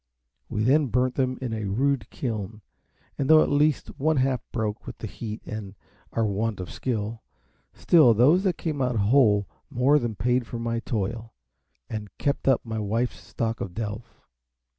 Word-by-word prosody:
We 105 - -1
then 140 +5 +4
burnt 125 +1 +1
them 130 -2 0
in 120 -3 -2
a 110 -2 -3
rude 125 +3 0
kiln, 110 -4 -4 0.6
and 135 - 0
though 160 0 +8
at - - -2
least 145 0 +1
one 155 +2 +2
half 130 -2 +1
broke 110 -3 -3
with - - -7
the - - -6
heat 110 -1 -6
and 105 -2 -6 0.4
our 115 - +1
want 105 +1 -1
of 90 - -6
skill, 115 -2 -3 0.5
still 140 -10 +5
those 145 - +5
that 180 -4 +1
came 155 -4 -3
out 125 -1 0
whole 105 -2 +4 0.2
more 140 +2 +3
than 120 -4 -3
paid 125 +4 +1
me - - -12
for 120 - -6
my 115 0 -2
toil, 115 0 -4 0.5
and 105 -2 -5
kept 140 -1 -1
up 135 -2 +3
my 110 -1 -3
wife's 115 +4 -1
stock 115 -1 -3
of 90 -3 -5
delf. 110 +1 -6
115 Hz, 180 wpm, -26 LUFS, 110-130 Hz, 0.6 s, though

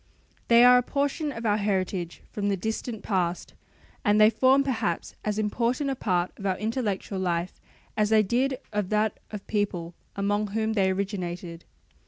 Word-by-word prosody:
They 235 0 +7
are 250 0 +8
a - - +1
portion 285 +4 -1
of 230 -3 -7
our 210 -1 +3
heritage 185 -4 -2
from 205 -1 -2
the 200 - 0
distant 220 +3 -4
past, 180 -4 -1 0.5
and 205 +1 +3
they 215 +1 +7
form 260 +5 +4
perhaps 230 -10 -2
as 210 -1 -1
important 235 +6 0
a - - -2
part 180 -7 0
of 200 - -8
our 185 -1 0
intellectual 210 -3 -2
life 175 -1 -2 0.3
as 210 -1 +2
they 220 -1 +5
did 255 +6 0 0.2
of 205 -3 -1
that 215 0 0
of 210 -2 -6
the - - -36
people 185 -5 -2 0.2
among 205 +1 0
whom 220 +2 -1
they 195 -3 +2
originated. 180 -3 -4
210 Hz, 175 wpm, -26 LUFS, 190-230 Hz, 0.5 s, are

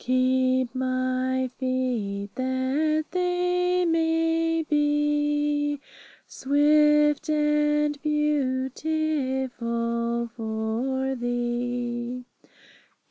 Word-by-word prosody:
Keep 255 0 +2
my 255 0 -1
feet, 240 -7 -2
that 260 +4 0
they 360 0 +1
may 330 0 +1
be 295 -1 +1 0.5
Swift 295 +2 +3
and 295 -1 +1
'beautiful' 260 -5 -1
for 230 +4 -2
Thee. 245 0 -3
265 Hz, 55 wpm, -25 LUFS, 250-300 Hz, 0.5 s, Swift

